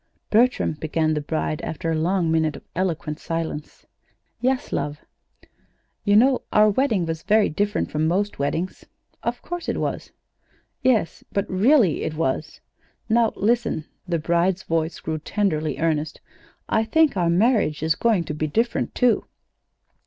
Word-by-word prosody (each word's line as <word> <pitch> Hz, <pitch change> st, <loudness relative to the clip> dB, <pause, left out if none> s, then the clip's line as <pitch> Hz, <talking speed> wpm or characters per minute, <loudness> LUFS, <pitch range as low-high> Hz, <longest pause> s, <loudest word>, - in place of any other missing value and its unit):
"Bertram," 240 Hz, -4 st, +3 dB
began 155 Hz, 0 st, 0 dB
the 150 Hz, -, -1 dB
bride, 155 Hz, +1 st, -2 dB
after 165 Hz, +1 st, -3 dB
a -, -, +1 dB
long 170 Hz, +1 st, +1 dB
minute 160 Hz, -2 st, +1 dB
of -, -, -11 dB
eloquent 165 Hz, -4 st, -2 dB
silence. 165 Hz, -2 st, -5 dB, 0.5 s
"Yes, 255 Hz, +1 st, 0 dB
love." 145 Hz, 0 st, -2 dB, 1.1 s
"You 205 Hz, -1 st, +3 dB
know 255 Hz, +4 st, +5 dB
our 210 Hz, 0 st, +5 dB
wedding 220 Hz, -6 st, +1 dB
was 165 Hz, 0 st, -3 dB
very 215 Hz, +2 st, +3 dB
different 205 Hz, +6 st, -1 dB
from 155 Hz, +1 st, 0 dB
most 200 Hz, +3 st, 0 dB
weddings." 160 Hz, +6 st, -2 dB, 0.4 s
"Of 240 Hz, +1 st, -3 dB
course 350 Hz, -1 st, -5 dB
it -, -, -1 dB
was!" -, -, -3 dB, 0.7 s
"Yes, 225 Hz, -10 st, +1 dB
but 200 Hz, -, -1 dB
really 205 Hz, -, +3 dB
it 155 Hz, -, -3 dB
was. 155 Hz, -1 st, -2 dB, 0.5 s
Now 230 Hz, 0 st, +3 dB
listen." 230 Hz, -7 st, 0 dB, 0.2 s
The 170 Hz, -1 st, 0 dB
bride's 170 Hz, +3 st, +1 dB
voice 165 Hz, 0 st, -1 dB
grew 155 Hz, 0 st, -3 dB
tenderly 155 Hz, -4 st, -1 dB
earnest. 155 Hz, -1 st, -1 dB, 0.5 s
"I 220 Hz, -, +2 dB
think 305 Hz, +5 st, +3 dB
our 175 Hz, -3 st, +1 dB
marriage 190 Hz, -, +2 dB
is 160 Hz, 0 st, +3 dB
going 215 Hz, 0 st, +1 dB
to 150 Hz, -, -5 dB
be 155 Hz, +1 st, -2 dB
different, 230 Hz, +10 st, -1 dB
too." 245 Hz, -3 st, +2 dB
175 Hz, 150 wpm, -23 LUFS, 155-220 Hz, 1.1 s, know